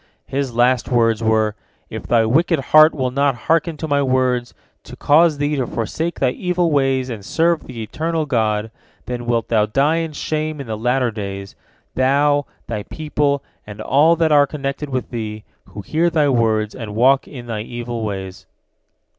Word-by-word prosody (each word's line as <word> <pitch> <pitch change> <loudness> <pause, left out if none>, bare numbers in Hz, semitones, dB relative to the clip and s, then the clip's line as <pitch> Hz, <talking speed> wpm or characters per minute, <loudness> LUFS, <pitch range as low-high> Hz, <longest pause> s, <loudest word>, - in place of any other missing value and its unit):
His 135 -3 -3
last 125 0 +2
words 115 -3 +2
were, 110 -1 +2 0.4
"If - - -7
thy 115 -2 +3
wicked 160 +7 +2
heart 155 +1 +8
will 130 -3 -1
not 140 0 +1
hearken 165 0 +1
to 160 - -4
my 145 -1 +1
words, 130 -2 0 0.3
to - - -10
cause 155 +1 +3
thee 145 +1 0
to 130 -3 -1
forsake 160 +9 -3
thy 130 -2 +2
evil 180 +1 -1
ways 135 -2 +1
and 105 -4 -7
serve 165 +8 +1
the 115 -3 -6
Eternal 160 +7 -2
God, 110 -5 0 0.3
then 120 -1 -5
wilt 115 -2 0
thou 105 -2 +2
die 140 +8 +2
in 165 -2 -3
shame 155 0 -3
in 140 - -6
the 110 -2 -4
latter 125 +2 0
days, 100 -2 -6 0.4
thou, 145 +2 +2 0.2
thy 110 -3 -4
people, 145 +1 -1 0.2
and 105 0 -9
all 145 +9 +3
that 165 -1 +1
are 145 -1 +5
connected 140 0 -4
with 130 -2 -3
thee, 110 -3 -5 0.2
who 100 +2 -9
hear 165 - +1
thy 155 -4 +2
words, 110 -4 +1
and 110 -5 -7
walk 130 +4 +3
in 125 -4 -9
thy 110 -3 -4
evil 120 0 -5
ways." 95 -3 -6
130 Hz, 180 wpm, -19 LUFS, 115-150 Hz, 0.4 s, heart